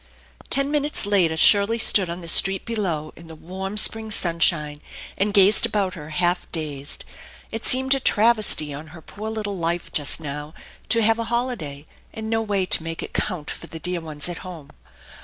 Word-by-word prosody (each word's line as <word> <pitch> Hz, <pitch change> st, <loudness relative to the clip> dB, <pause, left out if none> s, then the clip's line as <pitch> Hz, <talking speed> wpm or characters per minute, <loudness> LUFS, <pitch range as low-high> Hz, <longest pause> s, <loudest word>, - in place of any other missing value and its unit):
Ten 275 Hz, +1 st, 0 dB
minutes 295 Hz, -5 st, 0 dB
later 180 Hz, -6 st, +1 dB
Shirley 205 Hz, +6 st, +5 dB
stood 200 Hz, -5 st, +3 dB
on 170 Hz, +2 st, -5 dB
the 170 Hz, -, -10 dB
street 195 Hz, +3 st, +5 dB
below 180 Hz, -10 st, -3 dB
in 165 Hz, -, -14 dB
the 160 Hz, -, -11 dB
warm 190 Hz, +5 st, -7 dB
spring 220 Hz, +1 st, +4 dB
sunshine, 165 Hz, -6 st, +1 dB, 0.3 s
and 205 Hz, +2 st, 0 dB
gazed 200 Hz, +1 st, +4 dB
about 195 Hz, -3 st, 0 dB
her 150 Hz, -3 st, -9 dB
half 175 Hz, +3 st, -1 dB
dazed. 145 Hz, -4 st, -5 dB, 0.5 s
It 225 Hz, -, -5 dB
seemed 265 Hz, +1 st, +4 dB
a 270 Hz, -, 0 dB
travesty 215 Hz, -, +2 dB
on 150 Hz, +3 st, -8 dB
her -, -, -13 dB
poor 215 Hz, +7 st, -7 dB
little 215 Hz, -2 st, -4 dB
life 170 Hz, +1 st, -2 dB
just 145 Hz, +1 st, +2 dB
now 150 Hz, 0 st, -7 dB, 0.3 s
to 230 Hz, -1 st, +2 dB
have 225 Hz, +1 st, +3 dB
a 230 Hz, -, -2 dB
holiday 230 Hz, -, -3 dB, 0.3 s
and 220 Hz, 0 st, -6 dB
no 225 Hz, 0 st, +1 dB
way 200 Hz, -4 st, -1 dB
to 180 Hz, -, +1 dB
make 165 Hz, 0 st, -6 dB
it -, -, -9 dB
count 175 Hz, -7 st, -3 dB
for 170 Hz, -, -9 dB
the 165 Hz, -, -9 dB
dear 180 Hz, +1 st, -4 dB
ones 155 Hz, -1 st, -3 dB
at 175 Hz, -1 st, -6 dB
home. 170 Hz, -6 st, -10 dB
185 Hz, 190 wpm, -22 LUFS, 160-220 Hz, 0.5 s, Shirley